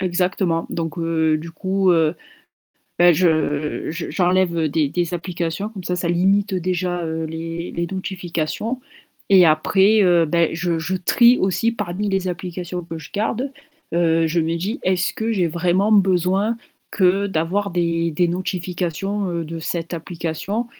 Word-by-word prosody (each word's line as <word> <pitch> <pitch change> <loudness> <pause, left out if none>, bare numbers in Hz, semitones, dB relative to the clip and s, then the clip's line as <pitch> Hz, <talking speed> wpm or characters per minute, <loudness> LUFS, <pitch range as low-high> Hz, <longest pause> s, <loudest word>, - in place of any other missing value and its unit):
Exactement, 180 -2 0
donc 165 0 -3
heu, 160 -1 +1
du 165 +2 -8
coup, 190 +3 +1
heu, 160 -1 +2 0.9
bah 175 0 +7
je 155 -3 0
je 165 +2 -5
j'enlève, 180 -1 +2
heu, 160 -2 +1
des 150 0 +1
des 175 +3 -2
applications 175 +2 -3
comme 200 -4 -9
ça 180 - -1
ça 175 -1 -2
limite 195 +3 +2
déjà, 180 -1 -1
heu, 160 0 -3
les 165 +2 -5
les 170 0 -2
notifications 185 +3 -3 0.5
et 190 -2 +7
après, 190 +7 +4
heu, 175 -3 +4
ben 165 +1 +2
je 170 0 -1
je 165 +4 -2
trie 235 +7 +5
aussi 195 +5 +1
parmi 205 -2 -3
les 190 -1 0
applications 180 0 -5
que 165 0 -7
je 150 - -11
garde, 235 +6 -1 0.4
heu, 165 -1 +2
je 170 +2 0
me 165 +1 0
dis: 200 - -3
«Est-ce 180 -2 +1
que 225 +1 -1
j'ai 180 -6 +1
vraiment 180 +5 +1
besoin 195 +2 +3 0.4
que 195 +1 +3
d'avoir 195 +3 -1
des 170 -1 0
des 175 +3 +2
notifications, 185 +2 -2
heu, 170 -1 -2
de 165 +1 -6
cette 170 +1 -4
application?» 170 +6 -4
175 Hz, 160 wpm, -21 LUFS, 165-190 Hz, 0.9 s, bah